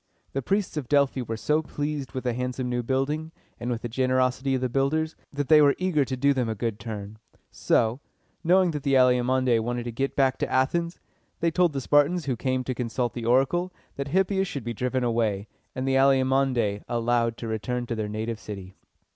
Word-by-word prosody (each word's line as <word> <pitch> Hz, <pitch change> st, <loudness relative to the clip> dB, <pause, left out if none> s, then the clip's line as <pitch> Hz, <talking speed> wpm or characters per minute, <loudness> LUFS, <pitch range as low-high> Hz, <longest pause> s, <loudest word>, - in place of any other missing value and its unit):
The 135 Hz, -, -1 dB
priests 195 Hz, +4 st, -1 dB
of 135 Hz, -5 st, -4 dB
Delphi 140 Hz, -2 st, +3 dB
were 115 Hz, -2 st, -4 dB
so 150 Hz, +7 st, +1 dB
pleased 145 Hz, -2 st, -4 dB
with 130 Hz, -, -4 dB
the 125 Hz, -2 st, 0 dB
handsome 125 Hz, +1 st, -3 dB
new 125 Hz, 0 st, -1 dB
building, 135 Hz, +6 st, -1 dB, 0.3 s
and 120 Hz, -, -3 dB
with 120 Hz, -1 st, -3 dB
the -, -, -1 dB
generosity 130 Hz, +2 st, +1 dB
of 130 Hz, -, -2 dB
the 130 Hz, -, +1 dB
builders, 140 Hz, +5 st, 0 dB, 0.2 s
that 145 Hz, -1 st, -3 dB
they 155 Hz, -1 st, +7 dB
were 140 Hz, -1 st, +5 dB
eager 180 Hz, -6 st, +1 dB
to 130 Hz, 0 st, -4 dB
do 140 Hz, +2 st, +3 dB
them 125 Hz, -4 st, -1 dB
a 110 Hz, -, -2 dB
good 110 Hz, 0 st, -3 dB
turn. 105 Hz, -1 st, -7 dB, 0.3 s
So, 115 Hz, +3 st, +1 dB, 0.4 s
knowing 180 Hz, +1 st, +4 dB
that 150 Hz, -2 st, -4 dB
the 135 Hz, 0 st, +1 dB
Alcmæonidæ 125 Hz, -1 st, +3 dB
wanted 120 Hz, +2 st, -2 dB
to 120 Hz, -, -4 dB
get 135 Hz, +4 st, -2 dB
back 135 Hz, -1 st, +2 dB
to -, -, -2 dB
Athens, 170 Hz, +6 st, 0 dB, 0.4 s
they 170 Hz, 0 st, +1 dB
told 175 Hz, -1 st, +2 dB
the 135 Hz, -, -2 dB
Spartans 145 Hz, +5 st, +3 dB
who 130 Hz, -3 st, 0 dB
came 130 Hz, +1 st, -1 dB
to 130 Hz, -, -2 dB
consult 120 Hz, 0 st, -2 dB
the 120 Hz, -2 st, -5 dB
oracle, 135 Hz, +9 st, +2 dB, 0.2 s
that 140 Hz, 0 st, -4 dB
Hippias 190 Hz, +4 st, +1 dB
should 140 Hz, -7 st, -5 dB
be 120 Hz, +1 st, -3 dB
driven 125 Hz, +2 st, -1 dB
away, 110 Hz, -4 st, 0 dB, 0.3 s
and 130 Hz, +1 st, -2 dB
the 135 Hz, -, +2 dB
Alcmæonidæ 130 Hz, -5 st, +2 dB
allowed 115 Hz, 0 st, +1 dB
to 115 Hz, -, -6 dB
return 120 Hz, +3 st, -2 dB
to 120 Hz, -, -3 dB
their 110 Hz, -2 st, -3 dB
native 110 Hz, +1 st, -3 dB
city. 95 Hz, -3 st, -8 dB
130 Hz, 205 wpm, -26 LUFS, 120-140 Hz, 0.4 s, they